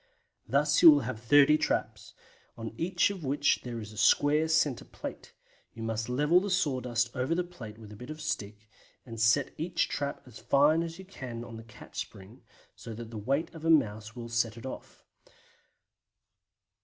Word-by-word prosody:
Thus 145 +1 +2
you 165 - +11
will 145 -2 +7
have 120 -2 -5
30 145 +5 +5
traps, - - -2 0.4
on 115 -1 -6
each 180 - +1
of 190 -5 -8
which 145 +1 +1
there 120 -2 -6
is 105 -1 -8
a - - -13
square 145 +8 +4
centre 155 -5 +1
plate; - - -9 0.4
you 115 - -7
must 115 +1 -3
level 150 +7 +3
the 200 - -3
sawdust 125 -9 0
over 130 +5 0
the 180 - 0
plate 120 -12 -10
with 110 -2 -12
a - - -9
bit 125 +6 -10
of 155 0 -7
stick, 105 -8 -5 0.4
and 115 -3 -7
set 115 +5 +3
each 165 +3 0
trap 140 -1 -3
as 125 -2 -13
fine 150 +4 +3
as 165 -1 -5
you 190 - -11
can 125 -11 -7
on 120 -1 -9
the 115 - -9
catch 110 -1 -11
spring, 100 +6 -9 0.3
so 115 - -9
that 115 0 -8
the 115 - -6
weight 140 +10 -1
of 160 -2 -10
a 165 - 0
mouse 110 -7 +2
would 115 -1 -8
set 115 -1 0
it 115 - -10
off. 130 - -9
130 Hz, 190 wpm, -29 LUFS, 115-155 Hz, 0.4 s, you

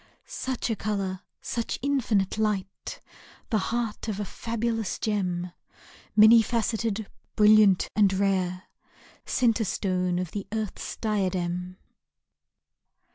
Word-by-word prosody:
Such 260 - -3
a - - 0
colour, 195 -3 -2 0.2
such 235 -1 -2
infinite 225 -8 +1
light! 200 -3 -2 0.5
The 215 - +3
heart 230 -2 -2
of 210 -2 -3
a 205 - -2
fabulous 230 -1 -2
gem, 180 -4 -1 0.6
Many 220 +2 +8
faceted, 225 -2 -1 0.3
brilliant 210 -3 +6
and 205 -2 +5
rare. 190 -2 0 0.6
Centre 230 -3 +2
Stone 185 -3 0
of 180 -2 -3
the 200 -2 -5
earth's 220 -2 -4
diadem! 185 -4 -1
210 Hz, 105 wpm, -27 LUFS, 185-225 Hz, 0.6 s, Many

